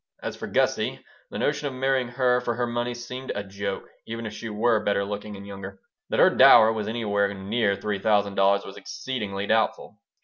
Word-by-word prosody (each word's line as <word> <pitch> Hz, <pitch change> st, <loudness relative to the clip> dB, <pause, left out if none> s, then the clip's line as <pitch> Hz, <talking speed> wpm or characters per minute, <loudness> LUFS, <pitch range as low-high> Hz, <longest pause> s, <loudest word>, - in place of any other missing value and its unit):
As -, -, -4 dB
for -, -, -7 dB
Gussie, -, -, 0 dB, 0.3 s
the -, -, -6 dB
notion 145 Hz, -, 0 dB
of 135 Hz, -, -5 dB
marrying 130 Hz, -1 st, +1 dB
her 125 Hz, 0 st, +1 dB
for 120 Hz, -1 st, -2 dB
her 120 Hz, +1 st, 0 dB
money 120 Hz, +1 st, -2 dB
seemed 125 Hz, +2 st, -6 dB
a 100 Hz, -, -3 dB
joke, 100 Hz, 0 st, -5 dB, 0.2 s
even 115 Hz, 0 st, -5 dB
if 105 Hz, -, -5 dB
she 115 Hz, +1 st, -6 dB
were 110 Hz, +1 st, +1 dB
better 100 Hz, -1 st, +1 dB
looking 105 Hz, +1 st, -6 dB
and 100 Hz, 0 st, -10 dB
younger. 100 Hz, -1 st, -8 dB, 0.3 s
That -, -, 0 dB
her -, -, +7 dB
dower 110 Hz, +1 st, +7 dB
was 105 Hz, -2 st, -3 dB
anywhere 100 Hz, -3 st, 0 dB
near 100 Hz, +1 st, 0 dB
three 105 Hz, 0 st, -3 dB
thousand 100 Hz, -1 st, +2 dB
dollars 100 Hz, +1 st, +3 dB
was -, -, -10 dB
exceedingly 105 Hz, -7 st, -4 dB
doubtful. 110 Hz, +1 st, 0 dB
105 Hz, 200 wpm, -25 LUFS, 100-120 Hz, 0.3 s, her